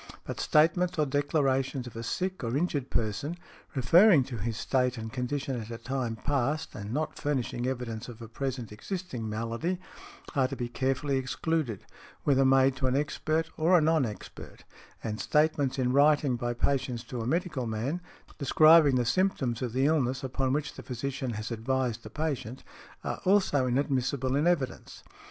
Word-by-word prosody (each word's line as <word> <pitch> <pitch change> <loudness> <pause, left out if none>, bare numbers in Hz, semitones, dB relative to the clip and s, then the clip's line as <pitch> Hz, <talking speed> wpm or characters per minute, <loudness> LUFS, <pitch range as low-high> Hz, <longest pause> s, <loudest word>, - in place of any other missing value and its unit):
But - - -6
statements 170 +4 +3
or 155 - +3
declarations 135 -2 0
of 125 - -10
a 115 - -4
sick 185 +8 -3
or 120 +3 0
injured 145 -5 -1
person, 115 +9 -2 0.4
referring 165 - +6
to 125 -2 -6
his 110 +1 -3
state 125 +1 0
and 110 0 -6
condition 130 0 -2
at 110 - -9
a 115 - -5
time 120 -1 -3
past, 145 +6 -1
and 105 0 -6
not 155 +5 -2
furnishing 130 -4 -1
evidence 125 -3 -4
of 120 -2 -10
a 115 - -8
present 125 -1 -4
existing 125 - -5
malady, 115 +12 -2 0.6
are 135 -2 +3
to 135 - -5
be 120 -2 -4
carefully 135 +2 0
excluded, 130 - -2 0.4
whether 135 -1 +4
made 135 0 +4
to 130 - 0
an 130 - +1
expert 155 +2 -1
or 170 +3 +5
a - - +5
non 160 -1 +3
expert, 105 -4 -8 0.4
and 110 -1 -3
statements 150 -3 +2
in 125 -1 +1
writing 145 -2 +4
by 120 0 -2
patients 130 -2 0
to 125 0 -5
a 115 - -3
medical 155 -5 -1
man, 120 +11 -2 0.4
describing 155 0 +6
the 125 -1 +2
symptoms 135 -6 0
of 125 -2 -2
the 130 +3 +1
illness 135 -5 +1
upon 130 0 -1
which 150 +2 -1
the - - -9
physician 130 0 -4
has 110 +2 -5
advised 120 0 -1
the 110 - -10
patient, 130 -4 -3 0.4
are - - -4
also 185 -9 +3
inadmissible 130 0 0
in 150 +4 +2
evidence. 155 -7 -1
130 Hz, 170 wpm, -29 LUFS, 120-150 Hz, 0.6 s, referring